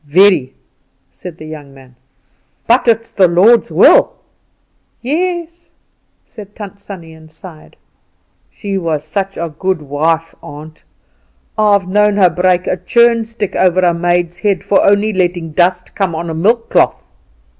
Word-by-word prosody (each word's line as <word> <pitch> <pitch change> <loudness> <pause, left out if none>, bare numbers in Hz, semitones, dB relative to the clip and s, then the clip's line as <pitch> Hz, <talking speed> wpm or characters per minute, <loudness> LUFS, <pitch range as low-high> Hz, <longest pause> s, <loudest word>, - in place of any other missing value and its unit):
"Very," 155 -3 +3 0.6
said 175 -3 -11
the 155 - -11
young 150 -3 -11
man; 130 -2 -18 0.7
"but 240 +2 +2
it's 230 0 +1
the 190 -3 +3
Lord's 195 +8 +3
will." - - +5 0.9
"Yes," 340 +4 -3 0.6
said 205 -1 -13
Tant 205 -1 -10
Sannie, 175 -5 -11
and 160 0 -17
sighed. 160 -1 -14 0.7
"She 200 -2 -5
was 160 -4 -3
such 195 +5 -4
a 165 -2 -5
good 190 -2 -1
wife, 160 +3 -1
aunt: 150 +2 -12 0.7
I've 205 -3 +2
known 210 +2 +2
her 185 -3 +4
break 180 +1 +1
a 185 - -2
churn 235 +2 +2
stick 220 -3 -6
over 185 0 +2
a 175 -1 +2
maid's 175 0 -1
head 200 0 -1
for 200 0 +2
only 205 +2 +2
letting 175 -3 -2
dust 180 +2 0
come 190 -5 -2
on 165 +1 -4
a - - -4
milk 225 +8 0
cloth." - - +1
185 Hz, 145 wpm, -14 LUFS, 165-205 Hz, 0.9 s, will